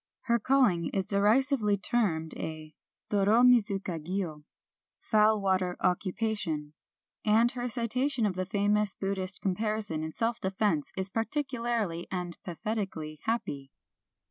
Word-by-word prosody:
Her 235 Hz, -2 st, +1 dB
call 265 Hz, +4 st, +4 dB
ing 170 Hz, -6 st, 0 dB
is 190 Hz, -1 st, +1 dB
derisively 210 Hz, +2 st, +3 dB
termed 190 Hz, -7 st, 0 dB
a 155 Hz, -1 st, -6 dB, 0.4 s
doro 210 Hz, +4 st, +4 dB
midzu 230 Hz, -5 st, +5 dB
kagyo 170 Hz, -3 st, -4 dB, 0.5 s
("foul 215 Hz, 0 st, +3 dB
water 185 Hz, -2 st, 0 dB
occupation"); 180 Hz, -5 st, -1 dB, 0.5 s
and 225 Hz, +3 st, +4 dB
her 245 Hz, -1 st, -3 dB
citation 240 Hz, +2 st, +1 dB
of 200 Hz, -, 0 dB
the 185 Hz, 0 st, -3 dB
famous 205 Hz, +1 st, +1 dB
Buddhist 195 Hz, -1 st, -1 dB
comparison 210 Hz, -3 st, -1 dB
in 160 Hz, 0 st, -5 dB
self 230 Hz, 0 st, 0 dB
defense 210 Hz, +9 st, 0 dB
is 190 Hz, 0 st, 0 dB
particularly, 230 Hz, -, -2 dB
and 180 Hz, -2 st, -4 dB
pathetically, 175 Hz, -5 st, -4 dB
happy. 145 Hz, -12 st, -2 dB
205 Hz, 120 wpm, -29 LUFS, 180-230 Hz, 0.5 s, midzu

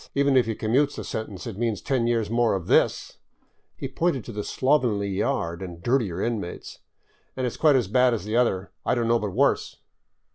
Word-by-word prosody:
Even 140 Hz, -1 st, +3 dB
if 125 Hz, -3 st, +4 dB
he 115 Hz, -, -2 dB
commutes 135 Hz, +8 st, +1 dB
the -, -, -5 dB
sentence, 105 Hz, -4 st, -6 dB
it 110 Hz, -3 st, -6 dB
means 115 Hz, -4 st, 0 dB
ten 125 Hz, -4 st, 0 dB
years 115 Hz, -3 st, +1 dB
more 115 Hz, -1 st, +2 dB
of 95 Hz, -3 st, -4 dB
this -, -, +1 dB, 0.2 s
" -, -, -41 dB
— -, -, -46 dB
he -, -, -4 dB
pointed 165 Hz, -8 st, -1 dB
to -, -, -7 dB
the 105 Hz, -1 st, -4 dB
slovenly 120 Hz, -8 st, +1 dB
yard 85 Hz, -3 st, -1 dB
and 85 Hz, -2 st, -8 dB
dirtier 115 Hz, -9 st, 0 dB
inmates 105 Hz, -5 st, -4 dB, 0.2 s
— -, -, -39 dB
'' -, -, -41 dB
and 130 Hz, -, -1 dB
it 125 Hz, -, -1 dB
's -, -, -11 dB
quite 155 Hz, -3 st, +4 dB
as 125 Hz, -6 st, +2 dB
bad 125 Hz, +4 st, +3 dB
as 110 Hz, -5 st, -2 dB
the 110 Hz, +1 st, -2 dB
other; 100 Hz, -6 st, +1 dB
I -, -, +1 dB
don't 120 Hz, -2 st, 0 dB
know 115 Hz, 0 st, +3 dB
but 105 Hz, -, -3 dB
worse." 90 Hz, -, +1 dB
115 Hz, 230 wpm, -25 LUFS, 100-125 Hz, 0.2 s, if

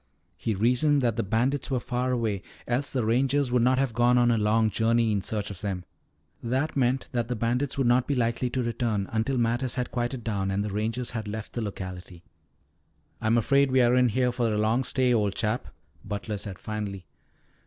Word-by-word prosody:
He 110 Hz, -, -2 dB
reasoned 125 Hz, +7 st, +2 dB
that 115 Hz, -3 st, +1 dB
the 115 Hz, -, 0 dB
bandits 120 Hz, +7 st, 0 dB
were 130 Hz, -2 st, +1 dB
far 125 Hz, +1 st, -2 dB
away 110 Hz, -6 st, -1 dB, 0.3 s
else 125 Hz, +4 st, 0 dB
the 125 Hz, -4 st, -1 dB
Rangers 130 Hz, +3 st, +2 dB
would 125 Hz, -1 st, +3 dB
not 130 Hz, +2 st, +3 dB
have 135 Hz, -3 st, 0 dB
gone 120 Hz, +1 st, +4 dB
on 120 Hz, -1 st, +4 dB
a 115 Hz, -, +2 dB
long 110 Hz, +1 st, +2 dB
journey 115 Hz, +1 st, +2 dB
in 100 Hz, -2 st, 0 dB
search 105 Hz, 0 st, -3 dB
of 95 Hz, -, -10 dB
them. 95 Hz, -3 st, -3 dB, 0.6 s
That 130 Hz, +6 st, -1 dB
meant 130 Hz, -1 st, +1 dB
that 120 Hz, -2 st, -1 dB
the 125 Hz, -, -2 dB
bandits 125 Hz, +5 st, -1 dB
would 135 Hz, -, +1 dB
not 120 Hz, +1 st, +3 dB
be 140 Hz, -, 0 dB
likely 120 Hz, +1 st, 0 dB
to 125 Hz, +1 st, -1 dB
return 115 Hz, -4 st, -1 dB
until 115 Hz, +4 st, 0 dB
matters 120 Hz, +1 st, 0 dB
had 125 Hz, -2 st, -2 dB
quieted 120 Hz, 0 st, -2 dB
down 100 Hz, -4 st, -1 dB
and 100 Hz, +1 st, 0 dB
the 105 Hz, -, -4 dB
Rangers 115 Hz, +4 st, -2 dB
had 110 Hz, -3 st, -4 dB
left 110 Hz, +1 st, -6 dB
the 120 Hz, -, -3 dB
locality. 95 Hz, -4 st, -7 dB, 1.0 s
"I -, -, -1 dB
am 115 Hz, +2 st, +4 dB
afraid 140 Hz, +4 st, +3 dB
we 130 Hz, -1 st, +4 dB
are 120 Hz, 0 st, +4 dB
in 125 Hz, -1 st, +4 dB
here 125 Hz, +2 st, +1 dB
for 120 Hz, -2 st, 0 dB
a 105 Hz, -, 0 dB
long 110 Hz, +4 st, +2 dB
stay, 130 Hz, -1 st, +2 dB
old 105 Hz, -4 st, +1 dB
chap," 105 Hz, -2 st, -1 dB, 0.4 s
Butler 105 Hz, +1 st, -4 dB
said 100 Hz, -2 st, -7 dB
finally. 100 Hz, -3 st, -5 dB
120 Hz, 210 wpm, -27 LUFS, 105-125 Hz, 1.0 s, gone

